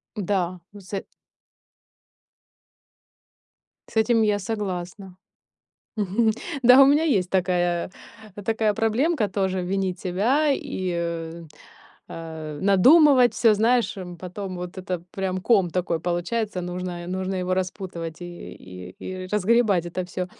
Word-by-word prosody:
Да, 185 -3 -1
м, 205 - -11
сэ 190 +1 -5 2.9
С - - -16
этим 225 +1 +3
я 210 -1 +2
согласна. 190 -2 -5 0.8
Мгм, 215 +3 +2 0.3
да 250 +3 +8
у - - +9
меня 290 +3 +4
есть 195 - +1
такая 175 -2 0 0.6
такая 220 -2 +1
проблемка 225 +5 +1
тоже- 190 -1 -1
винить 185 0 -2
себя 225 +13 +1
и, 190 -8 -3
э, 170 -1 -4 0.7
а, 160 -2 -7
надумывать 255 - +6
всё. 225 -2 +4
Знаешь, 230 +3 +2
эм, 180 -2 -7
потом 185 +2 -6
вот 180 +1 -7
это 185 -2 -4
прям 190 -1 -2
ком 195 -6 +3
такой 170 -2 -1
получается, 180 +4 -2
нужно 180 0 -5
е - - -8
нужно 185 +1 -3
его 185 0 -2
распутывать 180 -3 -4
и 175 0 -9
и 90 0 -11
и 185 0 -6
разгребать 210 -3 +2
это 180 +1 -4
всё. 180 0 -4
185 Hz, 125 wpm, -24 LUFS, 175-215 Hz, 2.9 s, у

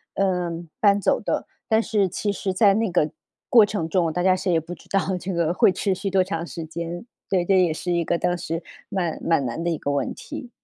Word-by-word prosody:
呃， 180 -3 0 0.3
搬 200 -1 +4
走 - - +2
的。 - - -2 0.2
但 220 0 +3
是 210 -5 +1
其 205 +3 -2
实 190 -1 -2
在 200 0 +5
那 220 -2 +1
个 155 -4 +1 0.4
过 230 -6 +7
程 170 -6 -3
中， 170 -2 +1
大 180 - -1
家 185 -1 +5
谁 185 0 -1
也 165 - +4
不 165 +3 -8
知 - - -14
道 195 -1 0
这 185 +1 -4
个 170 0 +1
会 - - +5
持 195 +1 0
续 195 +2 -3
多 190 -1 +3
长 165 -1 -4
时 165 -1 -6
间， 170 +4 -6 0.2
对， 185 -3 +2
这 190 0 +4
也 165 -3 +2
是 175 +2 -4
一 170 -1 +1
个 170 - +1
当 175 0 0
时 165 -1 -4 0.2
蛮 180 -5 -2
蛮 165 -5 +2
难 120 +7 -3
的 170 - 0
一 165 - -1
个 145 - -2
问 140 -2 -1
题。 245 - -8
180 Hz, 260 characters per minute, -24 LUFS, 165-195 Hz, 0.4 s, 过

